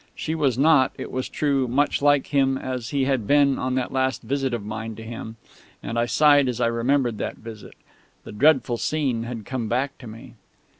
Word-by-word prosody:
She 160 Hz, -, -3 dB
was 140 Hz, -7 st, 0 dB
not, 140 Hz, -2 st, +4 dB
it -, -, -7 dB
was 130 Hz, 0 st, -3 dB
true, 140 Hz, -3 st, 0 dB
much 140 Hz, +5 st, +1 dB
like 145 Hz, -1 st, +3 dB
him 135 Hz, -1 st, +2 dB
as 125 Hz, -3 st, -5 dB
he 140 Hz, -2 st, 0 dB
had 130 Hz, -6 st, -1 dB
been 145 Hz, -2 st, +3 dB
on 130 Hz, 0 st, -1 dB
that 130 Hz, -1 st, -2 dB
last 130 Hz, -2 st, -1 dB
visit 135 Hz, +2 st, -1 dB
of 115 Hz, -4 st, -4 dB
mine 110 Hz, +1 st, -5 dB
to 115 Hz, -, -10 dB
him... 110 Hz, 0 st, -8 dB, 0.5 s
and 115 Hz, -, -3 dB
I 120 Hz, -, +1 dB
sighed 145 Hz, 0 st, +4 dB
as 120 Hz, -, -4 dB
I -, -, +2 dB
remembered 115 Hz, 0 st, 0 dB
that -, -, -3 dB
visit. 110 Hz, -2 st, -11 dB, 0.5 s
The -, -, -10 dB
dreadful 130 Hz, +1 st, +3 dB
scene 130 Hz, -5 st, -1 dB
had 115 Hz, -3 st, -6 dB
come 125 Hz, -4 st, -3 dB
back 130 Hz, +5 st, -2 dB
to 125 Hz, -, -10 dB
me.... 110 Hz, +1 st, -11 dB
130 Hz, 205 wpm, -23 LUFS, 115-140 Hz, 0.5 s, not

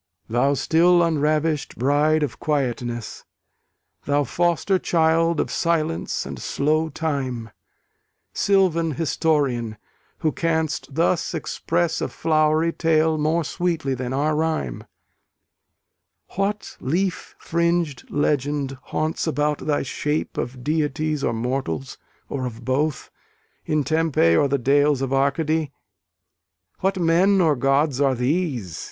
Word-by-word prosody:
Thou 130 Hz, +5 st, +2 dB
still 170 Hz, +4 st, +4 dB
unravish'd 155 Hz, -1 st, 0 dB
bride 150 Hz, +4 st, +2 dB
of 140 Hz, -, -4 dB
quietness, 120 Hz, -6 st, -2 dB, 0.8 s
Thou 145 Hz, 0 st, +2 dB
foster 175 Hz, +6 st, +1 dB
child 165 Hz, -1 st, +2 dB
of -, -, -1 dB
Silence 165 Hz, -1 st, -1 dB
and -, -, -7 dB
slow 155 Hz, +3 st, 0 dB
Time, 135 Hz, -7 st, -3 dB, 0.8 s
Sylvan 175 Hz, -5 st, +2 dB
historian, 140 Hz, -8 st, 0 dB, 0.4 s
who 155 Hz, -2 st, +2 dB
canst 160 Hz, -4 st, -2 dB
thus 170 Hz, +1 st, +1 dB
express 165 Hz, +1 st, -1 dB
A -, -, 0 dB
flowery 155 Hz, +1 st, +1 dB
tale 160 Hz, -1 st, +2 dB
more 160 Hz, +3 st, +1 dB
sweetly 165 Hz, -5 st, -1 dB
than 125 Hz, -1 st, -4 dB
our 150 Hz, +3 st, +1 dB
rhyme: 155 Hz, -, -2 dB, 1.4 s
What 200 Hz, +2 st, -3 dB
leaf 175 Hz, +6 st, -2 dB
fring'd 170 Hz, -4 st, -1 dB
legend 145 Hz, -2 st, -1 dB
haunts 155 Hz, +2 st, -2 dB
about 150 Hz, -1 st, 0 dB
thy 145 Hz, -1 st, +1 dB
shape 150 Hz, +3 st, -2 dB
Of 125 Hz, 0 st, -4 dB
deities 150 Hz, 0 st, -1 dB
or -, -, +1 dB
mortals, 115 Hz, -, -3 dB, 0.3 s
or 130 Hz, -2 st, -3 dB
of 115 Hz, 0 st, -9 dB
both, 140 Hz, +3 st, -1 dB, 0.6 s
In 155 Hz, -1 st, +1 dB
Tempe 155 Hz, -, +2 dB
or 140 Hz, -, +4 dB
the 140 Hz, +1 st, +1 dB
dales 140 Hz, +1 st, +2 dB
of 135 Hz, 0 st, -2 dB
Arcady? 145 Hz, +2 st, +1 dB, 1.1 s
What 190 Hz, +1 st, 0 dB
men 180 Hz, +3 st, +3 dB
or 160 Hz, -5 st, +3 dB
gods 135 Hz, +1 st, +1 dB
are 135 Hz, -2 st, +3 dB
these? 125 Hz, -, -1 dB
150 Hz, 115 wpm, -23 LUFS, 135-165 Hz, 1.4 s, still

